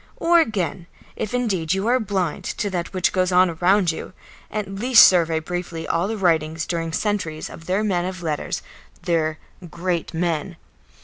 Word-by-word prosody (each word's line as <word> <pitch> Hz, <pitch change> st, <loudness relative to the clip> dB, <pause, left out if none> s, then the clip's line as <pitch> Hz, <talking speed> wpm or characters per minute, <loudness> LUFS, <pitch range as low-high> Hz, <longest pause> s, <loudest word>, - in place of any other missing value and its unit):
Or 340 Hz, 0 st, +4 dB
again, 185 Hz, -, -1 dB, 0.3 s
if 215 Hz, -, -4 dB
indeed 195 Hz, -9 st, 0 dB
you 195 Hz, +2 st, -2 dB
are 250 Hz, +2 st, +3 dB
blind 190 Hz, -7 st, -2 dB
to 205 Hz, -3 st, -3 dB
that 175 Hz, -2 st, -3 dB
which 185 Hz, -1 st, +1 dB
goes 185 Hz, -1 st, +1 dB
on 180 Hz, 0 st, +4 dB
around 180 Hz, +2 st, +3 dB
you, 160 Hz, -, -8 dB, 0.4 s
at 210 Hz, -2 st, -3 dB
least 225 Hz, +5 st, +6 dB
survey 170 Hz, -3 st, +2 dB
briefly 170 Hz, 0 st, -5 dB
all 170 Hz, +3 st, 0 dB
the 220 Hz, +1 st, -3 dB
writings, 160 Hz, -4 st, +1 dB
during 165 Hz, -1 st, -3 dB
centuries, 175 Hz, -5 st, -2 dB
of 165 Hz, -, -12 dB
their 190 Hz, +3 st, +1 dB
men 180 Hz, -4 st, 0 dB
of 185 Hz, -1 st, -5 dB
letters, 155 Hz, -3 st, -3 dB, 0.4 s
their 160 Hz, -3 st, 0 dB, 0.3 s
"great 175 Hz, 0 st, -2 dB
men." 170 Hz, 0 st, -2 dB
180 Hz, 170 wpm, -22 LUFS, 165-200 Hz, 0.4 s, least